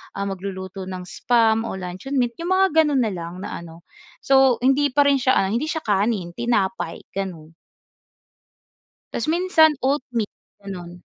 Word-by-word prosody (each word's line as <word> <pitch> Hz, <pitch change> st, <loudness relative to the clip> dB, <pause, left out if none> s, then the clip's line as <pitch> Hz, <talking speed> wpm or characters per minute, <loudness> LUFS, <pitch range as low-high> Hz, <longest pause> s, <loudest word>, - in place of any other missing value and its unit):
ah, 200 Hz, -, -2 dB
magluluto 190 Hz, -1 st, -5 dB
ng 185 Hz, -1 st, -6 dB
spam 225 Hz, +3 st, +1 dB
o -, -, -4 dB
luncheon 185 Hz, +9 st, -6 dB
meat. 245 Hz, +2 st, 0 dB
'Yong 335 Hz, -, -4 dB
mga 385 Hz, 0 st, +5 dB, 0.2 s
gano'n 285 Hz, -4 st, +1 dB
na 215 Hz, -, -1 dB
lang 170 Hz, -1 st, -6 dB
na -, -, -5 dB
ano. 170 Hz, 0 st, -12 dB, 0.4 s
So 265 Hz, -3 st, +4 dB
hindi 270 Hz, +1 st, +2 dB
pa 290 Hz, -, +6 dB
rin 280 Hz, -1 st, +3 dB
siya, 260 Hz, 0 st, +3 dB
ah, 195 Hz, +1 st, +2 dB
hindi 245 Hz, +7 st, -1 dB
siya 320 Hz, 0 st, -3 dB
kanin, 200 Hz, -3 st, 0 dB
tinapay 230 Hz, -6 st, -1 dB
gano'n. 175 Hz, -5 st, -5 dB, 1.6 s
Tas 230 Hz, -, -2 dB
minsan 335 Hz, -3 st, +4 dB, 0.2 s
oatmeal, 245 Hz, -6 st, -2 dB, 0.3 s
gano'n. 185 Hz, -3 st, -7 dB
220 Hz, 155 wpm, -22 LUFS, 190-270 Hz, 1.6 s, pa